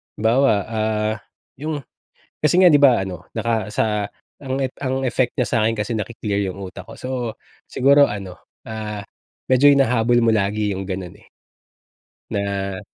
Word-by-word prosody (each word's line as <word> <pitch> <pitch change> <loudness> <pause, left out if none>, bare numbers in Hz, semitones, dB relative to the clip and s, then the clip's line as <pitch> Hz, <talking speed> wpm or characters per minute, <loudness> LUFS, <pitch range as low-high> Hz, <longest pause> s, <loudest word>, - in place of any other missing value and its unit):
halimbawa, 120 +5 +3 0.2
ah, 110 -1 -1 0.4
yung 155 +1 -3 0.6
kasi 150 +4 +3
nga 180 - +8
'di 145 -3 +5
ba 130 -7 +6
ano, 90 -2 -6
naka 115 -2 -1
sa - - +2 0.5
ang 135 -1 -3
ep 130 -1 -2
ang 130 -1 -2
effect 130 -1 0
niya 125 - 0
sa'kin 115 -1 +2
kasi 105 +2 -2
naki-clear 105 -2 -2
yung 100 - -10
utak 95 -1 -8
ko. - - -11
So 130 - -6 0.6
siguro 140 +2 +5
ano, 100 -3 -6 0.3
ah, 105 -2 -5 0.5
medyo 130 +2 +6
hinahabol 120 -4 +3
mo 115 - +3
lagi 105 0 0
yung 95 0 -5
gano'n, 95 -2 -5
eh. - - -22 1.0
Na 100 -1 -2
110 Hz, 155 wpm, -21 LUFS, 100-130 Hz, 1.0 s, nga